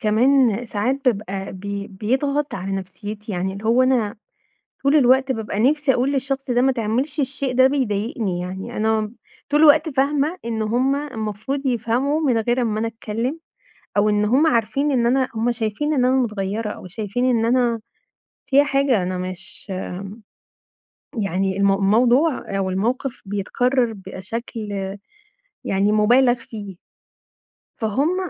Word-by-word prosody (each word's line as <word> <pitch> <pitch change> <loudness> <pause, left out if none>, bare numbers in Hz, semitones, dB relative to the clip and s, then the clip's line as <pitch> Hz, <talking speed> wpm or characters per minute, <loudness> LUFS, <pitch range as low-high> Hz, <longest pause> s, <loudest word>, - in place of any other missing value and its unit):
كمان 240 +1 +3
ساعات 250 +6 -1
بابقى 195 -3 -3
بي 200 +1 -5
بيضغط 270 +9 -1
على 190 +1 -4
نفسيتي، 205 +3 -6
يعني 185 +1 -2
اللي 200 +3 -9
هو 235 +3 +4
أنا 250 -5 +1 0.7
طول 280 +2 +4
الوقت 265 -1 +4
بابقى 220 -4 -3
نفسي 285 +3 +3
أقول 255 +3 +1
للشخص 270 -1 -2
ده 245 0 +3
ما 265 +1 +4
تعملش 255 +6 -1
الشيء 270 -1 -1
ده 260 +1 +6
بيضايقني 220 -7 -1
يعني، 185 +2 -6
أنا 220 0 0 0.4
طول 295 +1 +2
الوقت 310 +1 +6
فاهمة 290 +4 +1
إن 225 -1 -2
هُم 245 +5 +1
المفروض 265 -1 -4
يفهموا 250 +4 0
من 260 -7 +2
غير 240 +3 +1
ما 215 -2 -1
أنا 225 - 0
أتكلم، 230 +6 -4 0.6
أو 205 +1 +4
إن 210 0 +2
هُم 260 +9 +3
عارفين 275 +2 +1
إن 240 -3 +2
أنا 260 +2 +2
هُم 230 +2 +1
شايفين 235 +6 -1
إن 255 -3 +2
أنا 255 +1 +3
متغيرة 215 -3 -1
أو 210 - -8
شايفين 210 +5 -3
إن 240 -3 +2
أنا 240 -1 +2 0.7
فيَّ 280 +1 +5
حاجة، 275 -6 +2
أنا 180 0 -2
مش 185 +2 -7 1.5
يعني 190 0 -1
المو 200 0 +4
الموضوع 240 +4 +2
أو 190 -1 -1
الموقف 235 +7 -2
بيتكرر 235 +5 0
بشكل 210 +3 -6 0.9
يعني 195 +2 +1
مُبالغ 240 +4 +5
فيه. 215 -5 -9 1.0
فهُم 295 - 0
230 Hz, 140 wpm, -21 LUFS, 205-265 Hz, 1.5 s, ده